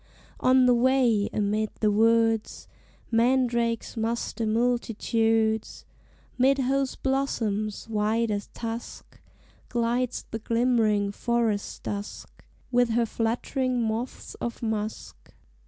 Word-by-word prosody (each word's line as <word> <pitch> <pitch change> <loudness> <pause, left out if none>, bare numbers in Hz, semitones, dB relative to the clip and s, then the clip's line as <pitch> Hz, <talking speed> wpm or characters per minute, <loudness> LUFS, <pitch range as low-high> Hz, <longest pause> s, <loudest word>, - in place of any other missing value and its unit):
On 255 0 +5
the 250 - +5
way, 240 -4 +3
amid 210 +1 0
the 215 -1 +2
woods, 225 +1 +2 0.4
Mandrakes 235 -1 +1
muster 230 0 -2
multitudes, 225 -1 0 0.5
'Mid 270 +2 +4
whose 270 0 0
blossoms, 225 -7 -1
white 220 +1 0
as 205 -1 -3
tusk, 230 0 -7 0.5
Glides 240 +1 -1
the 225 - -3
glimmering 225 -3 +1
Forest 230 -2 -1
Dusk, 205 0 -6 0.3
With 245 -1 +3
her 230 +1 +2
fluttering 245 +3 -1
moths 230 +2 -3
of 235 0 -4
musk. 220 -1 -5
230 Hz, 100 wpm, -26 LUFS, 220-245 Hz, 0.5 s, On